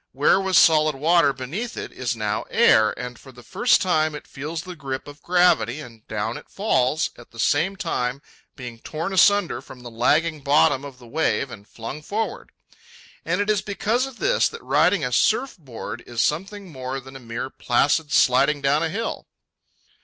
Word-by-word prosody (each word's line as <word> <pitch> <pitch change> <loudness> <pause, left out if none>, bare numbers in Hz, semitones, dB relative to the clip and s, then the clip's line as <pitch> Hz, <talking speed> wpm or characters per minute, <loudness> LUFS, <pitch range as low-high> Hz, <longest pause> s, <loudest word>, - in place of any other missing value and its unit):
Where 145 +8 +3
was 190 -2 +2
solid 155 -3 +5
water 160 +1 +3
beneath 165 - -5
it, - - -5
is 125 -2 -3
now 105 -1 -2
air, 110 -1 +5
and 125 -1 -7
for 135 - -14
the 125 -1 -15
first 245 - +2
time 155 -4 +1
it - - -9
feels 155 +4 -6
the 180 -1 -8
grip 135 -3 -5
of 145 +1 -12
gravity, 175 -9 +2
and 115 -6 -12
down 110 +2 -3
it - - -13
falls, 155 - 0
at 120 - -14
the 115 - -17
same 160 - +1
time 135 -9 -3 0.3
being 120 -3 -9
torn 165 +9 -5
asunder 200 0 +3
from 125 - -13
the 120 - -9
lagging 150 +7 +1
bottom 140 -1 +3
of 140 -3 -9
the 125 - -15
wave 135 +1 -1
and 105 -2 -11
flung 120 +6 -8
forward. 215 +8 -4 0.8
And 180 +4 0
it 205 - -2
is 210 - +1
because 220 +5 -1
of 265 -3 -11
this - - +2
that - - -10
riding 150 +5 +2
a 125 - -3
surf 235 - +2
board 120 -4 -8
is 120 -1 -6
something 190 - -1
more 130 -1 -5
than 135 +1 -13
a - - -8
mere 120 +2 -6
placid 145 +5 +1
sliding 140 +2 +4
down 140 +2 +2
a 165 - 0
hill. 225 +7 -4
145 Hz, 190 wpm, -23 LUFS, 125-175 Hz, 0.8 s, solid